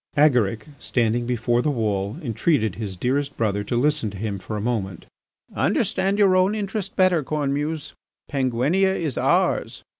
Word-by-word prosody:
Agaric, 125 -7 +3
standing 120 0 0
before 120 0 +1
the 150 - 0
wall, 105 -6 -1
entreated 115 - +1
his 100 -3 -6
dearest 140 +6 -1
brother 105 -3 0
to 120 +3 -2
listen 150 -4 +1
to 100 - -9
him 100 -1 -3
for 95 +4 -5
a - - -2
moment: 100 -6 -3 0.5
"Understand 195 +1 +1
your 195 -3 +4
own 185 +3 +3
interest 200 -1 -4
better, 185 -5 +3
Cornemuse! 150 +1 -2 0.3
Penguinia 140 +9 +1
is 155 -8 -2
ours. - - +1
125 Hz, 150 wpm, -23 LUFS, 110-155 Hz, 0.5 s, your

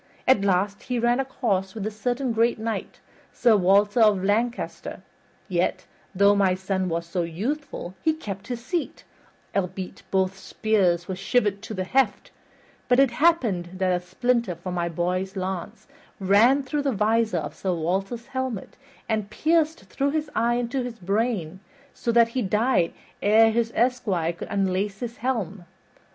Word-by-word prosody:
At 255 -6 +5
last 200 +1 +1
he 250 -1 -3
ran 240 +2 +2
a 270 - 0
course 195 -7 -1
with 210 -2 -4
a 215 - -2
certain 245 +3 -1
great 230 +1 +2
knight, 220 0 -4 0.3
Sir 235 -3 +4
Walter 205 +3 +4
of 210 -4 +4
Lancaster, 230 +5 -1 0.4
yet, - - 0 0.3
though 200 +2 +5
my 195 -2 +3
son 190 0 -2
was 170 0 -2
so 175 +1 -2
youthful, 195 - -4
he 315 - +2
kept 200 -11 -7
his 240 -1 -5
seat, 345 +1 -3 0.5
albeit 185 -1 -3
both 190 0 +1
spears 190 -5 +1
were 190 - -3
shivered 200 +1 0
to 220 0 -6
the 185 - -2
heft; 255 +2 0 0.6
but 250 +1 +4
it 270 -3 +5
happened 235 - +1
that 185 -1 +1
a 180 - -3
splinter 235 +2 0
of 170 +2 -18
my 175 -2 -1
boy's 180 +3 -2
lance 190 +3 -4 0.3
ran 220 +9 +4
through 290 +2 -2
the 280 -1 0
visor 220 -2 +1
of 150 -2 -4
Sir 190 - -2
Walter's 195 +8 -2
helmet 260 -6 -4 0.3
and 215 -3 -1
pierced 320 +6 +1
through 270 +9 -1
his 300 0 -2
eye 235 +1 +2
into 245 +2 -1
his 245 -2 -5
brain, 195 -3 -1 0.3
so 235 - -2
that 230 0 +5
he 255 +2 -2
died 210 -3 +2 0.3
ere 225 +2 +5
his 230 0 0
esquire 220 -9 +1
could 170 - -8
unlace 195 +1 -1
his 240 -1 -5
helm. 210 -7 -2
210 Hz, 165 wpm, -25 LUFS, 185-245 Hz, 0.6 s, At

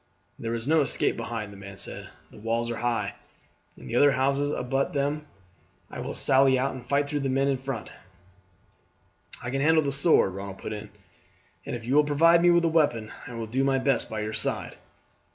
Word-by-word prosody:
"There 115 0 -3
is 115 +2 -4
no 160 +1 +4
escape 135 - +2
behind," 115 -3 -5
the - - -12
man 100 -1 -10
said; - - -5 0.2
"the - - -14
walls 115 +2 -1
are 115 - -4
high, 120 0 -1 0.6
and 115 - -6
other 145 +2 +5
houses 140 +2 +1
abut 135 -1 -1
upon - - -14
them. 145 +2 -1 0.6
I - - -7
will - - -5
sally 135 0 +4
out 135 +2 0
and 130 -2 -8
fight 140 +4 +1
through 145 0 -2
the 135 -1 -1
men 135 +1 +1
in 135 -2 0
front." 135 -4 -5 1.5
"I 125 - -4
can 135 +1 -1
handle 160 +2 +4
the 140 - -1
sword," 140 - +3
Ronald 95 0 -7
put 110 - -6
in; 105 0 -7 0.8
"and - - -3
if 115 -1 -7
you 125 - -1
will 150 +1 +6
provide 165 +4 +4
me 175 - +5
with 170 -1 +4
a - - +4
weapon 145 -10 +1 0.2
I 125 - -8
will 115 -1 -4
do 125 +5 -1
my 135 -1 +2
best 135 0 0
by 110 -1 -3
your 105 +1 -4
side." - - -1
135 Hz, 210 wpm, -26 LUFS, 115-145 Hz, 1.5 s, will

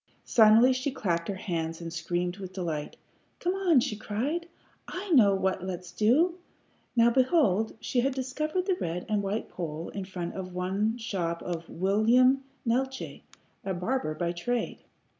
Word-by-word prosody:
Suddenly 225 +3 +6
she 255 +2 -1
clapped 175 -10 -1
her 200 - -2
hands 165 -4 -3
and 165 -1 -6
screamed 175 +2 -2
with 190 -2 -8
delight. 165 -5 -4 0.4
"Come 355 +1 0
on!" 370 -7 +4
she 215 - -2
cried. 265 +12 -2 0.4
"I 375 +1 -5
know 210 -10 +6
what 190 -1 0
let's 180 -2 -5
do." 320 +12 +3 0.6
Now 235 0 +5
behold, 235 - +2
she 245 - -1
had 265 +2 +1
discovered 305 +7 -2
the 375 -2 +1
red 170 +1 -3
and 210 -1 +1
white 200 +3 -2
pole 165 -2 -5
in 195 -2 -5
front 180 -2 -5
of 185 -1 -6
the 195 +4 0
shop 175 -7 -3
of 170 -1 -5
one - - -11
William 235 +8 +4 0.2
Neeltje, 265 +3 -1 0.4
a 190 -1 -2
barber 180 -3 -1
by 170 0 -1
trade. 225 +7 -2
210 Hz, 160 wpm, -28 LUFS, 180-255 Hz, 0.6 s, Suddenly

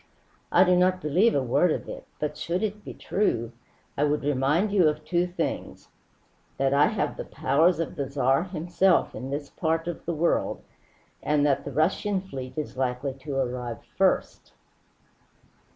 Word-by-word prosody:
I 180 - +6
do 180 -1 +4
not 185 +1 +3
believe 180 +8 +2
a 140 - +2
word 140 +8 +2
of - - -3
it; - - -8
but 150 0 -2
should 170 +6 -2
it 210 0 -3
be - - -8
true, 120 - -1 0.4
I 145 - +1
would 150 0 +1
remind 145 +8 +1
you 190 -5 +4
of 150 0 -5
two 175 0 +1
things: 180 - -4 0.7
that 135 0 +1
I 145 +1 +5
have - - -2
the - - -4
powers 160 +6 +2
of 165 - -3
the 140 -2 -3
Tsar 135 +3 +2
himself 180 +1 +1
in 130 - -6
this 145 +1 -4
part 165 0 -1
of 175 - -5
the 170 - 0
world, 170 +3 0 0.6
and 150 -1 +2
that 140 -2 +1
the 145 - -5
Russian 190 +7 +1
fleet 135 -8 -8
is 150 -4 -4
likely 130 +1 -1
to 135 +1 -7
arrive 125 -3 -3
first." - - 0
150 Hz, 170 wpm, -26 LUFS, 135-180 Hz, 0.7 s, I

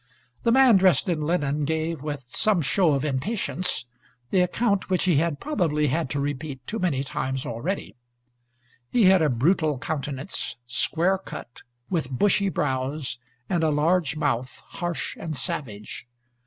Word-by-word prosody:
The 230 - +2
man 255 -4 +7
dressed 185 -5 +4
in 165 -3 0
linen 150 -2 0
gave, 160 0 -1
with 145 -3 -4
some 185 - +2
show 170 +2 +3
of 140 +1 0
impatience, 180 - -1 0.5
the 190 - +3
account 200 +2 +1
which 185 -1 +2
he 175 -6 +3
had 160 -1 +1
probably 160 - 0
had 160 +1 -1
to 145 - -2
repeat 140 -1 -4
too 225 - -3
many 150 -8 0
times 130 -1 -3
already. 150 - -3 0.9
He 240 - +3
had 190 -2 +6
a 155 - +3
brutal 150 +4 +2
countenance, 140 0 -3
square 165 +10 +1
cut, 120 -9 -9 0.3
with 160 -7 0
bushy 200 +8 +2
brows, 135 -3 -2 0.3
and 175 -3 0
a 160 - +3
large 155 +1 +2
mouth, 125 -4 -1
harsh 175 -1 -3
and 160 -2 -4
savage. 125 - -5
155 Hz, 150 wpm, -25 LUFS, 135-185 Hz, 0.9 s, man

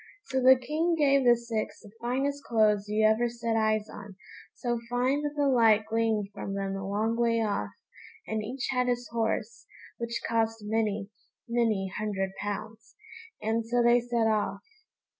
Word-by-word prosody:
So 265 -1 0
the 260 +1 +8
King 310 +7 0
gave 275 -3 +3
the 240 -1 +7
six 230 -2 -4
the 205 - -14
finest 275 +4 -1
clothes 210 -3 +2
you 215 +1 +2
ever 220 +3 +3
set 230 -1 -2
eyes 215 -1 +1
on, 205 -2 -10 0.4
so 240 -1 -2
fine 255 +4 +1
that 295 0 -3
the 290 -1 +1
light 225 -5 +4
gleamed 220 -2 0
from 195 -1 -5
them 195 0 -2
a 195 0 -5
long 215 +3 0
way 230 -1 +2
off, 200 - -1 0.6
and 220 0 -2
each 250 +4 -4
had 250 -1 +1
his 245 0 -1
horse, 225 -1 -2 0.3
which 235 0 -3
cost 225 -1 0
many, 210 -1 -1 0.4
many 220 -5 0
hundred 195 -3 -2
pounds, 215 +2 -6 0.5
and 225 +1 0
so 240 +1 +2
they 240 +1 +5
set 240 -1 0
off. 215 -1 0
225 Hz, 165 wpm, -28 LUFS, 215-245 Hz, 0.6 s, the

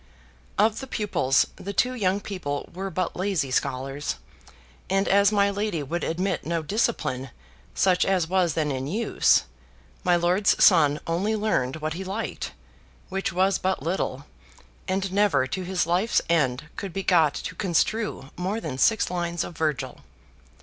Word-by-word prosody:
Of 215 +2 +3
the 265 - -7
pupils 200 - +2
the 200 - -6
two 250 +5 +2
young 200 -4 0
people 155 -9 -4
were 190 +2 -4
but 185 -1 -2
lazy 180 -8 -1
scholars, 135 - -1 0.7
and 195 +1 +2
as 200 +1 +5
my 200 -1 +3
lady 200 -6 -2
would 165 +5 -3
admit 180 +2 -1
no 165 0 -2
discipline 155 - -1 0.5
such 185 -2 +3
as 185 -4 +1
was 180 -3 +1
then 150 -2 0
in 130 0 -3
use, 215 +8 +3 0.6
my 180 - +4
lord's 180 +4 +3
son 150 -5 +5
only 190 +7 0
learned 205 -12 0
what 155 0 -3
he 185 +3 -5
liked, 195 +4 -4 0.6
which 195 0 -2
was 190 +2 +2
but 190 -6 -1
little, 145 -5 -2 0.6
and 190 0 -1
never 200 -10 +3
to 160 +9 -4
his 180 -1 0
life's 180 +7 +2
end 140 -6 +1
could 195 -4 -5
be 195 - -3
got 160 -6 +4
to 165 - -5
construe 190 -2 -1
more 190 +5 -2
than 145 - -5
six 220 - +3
lines 175 -1 -1
of 175 - -8
Virgil. 150 -5 -2
180 Hz, 155 wpm, -25 LUFS, 155-200 Hz, 0.7 s, as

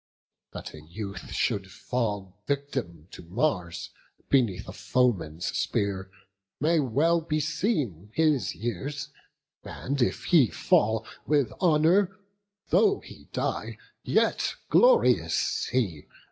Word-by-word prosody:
That - - -7
a 75 - -10
youth 100 +3 -7
should 100 -1 -1
fall 100 -5 -3
Victim, 130 - -3
to - - -10
Mars, 90 - -2 0.4
beneath 120 -9 +2
a - - -6
foeman's 90 -11 0
spear, 95 -2 -1 0.5
May 160 +3 +3
well 150 +6 +2
beseem 150 - -1
his 155 - +2
years; 120 - -4 0.5
and 140 +1 -4
if 120 - +1
he 160 -9 +5
fall 110 +2 +2 0.2
With 145 -4 +2
honour, 180 +3 +3 0.5
though 405 -2 +4
he - - -13
die, - - -2 0.2
yet - - +1 0.2
glorious - - +4
he! 100 - -1
125 Hz, 105 wpm, -27 LUFS, 95-155 Hz, 0.5 s, he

